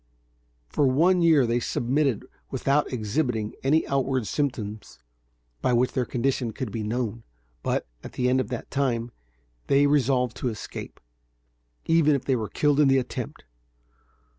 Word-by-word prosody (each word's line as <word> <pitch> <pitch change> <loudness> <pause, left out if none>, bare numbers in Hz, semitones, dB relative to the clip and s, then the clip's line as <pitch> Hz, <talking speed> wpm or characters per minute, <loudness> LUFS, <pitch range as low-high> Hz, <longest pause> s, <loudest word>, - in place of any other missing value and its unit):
For 140 - +1
one 170 +8 +4
year 160 -6 +5
they 120 +1 +1
submitted 130 0 0 0.2
without 140 +2 +1
exhibiting 110 -1 -1
any 150 +4 +2
outward 135 -3 0
symptoms 110 - -3 0.6
by 125 - +2
which 125 +1 +2
their 125 - 0
condition 125 -2 -1
could 125 -2 -4
be 110 - -3
known; 115 +1 -2 0.4
but, - - -1 0.2
at - - -9
the 125 - 0
end 130 +1 +3
of 120 - -4
that 120 0 -6
time, 120 -4 0 0.6
they 140 +1 +4
resolved 130 -4 +2
to 125 - -1
escape, 110 -4 -7 0.9
even 160 -3 +4
if 135 - -3
they 135 - +2
were 110 -3 -3
killed 145 -1 +2
in 150 - +6
the 135 0 +4
attempt. 130 - -4
130 Hz, 150 wpm, -26 LUFS, 115-140 Hz, 0.9 s, in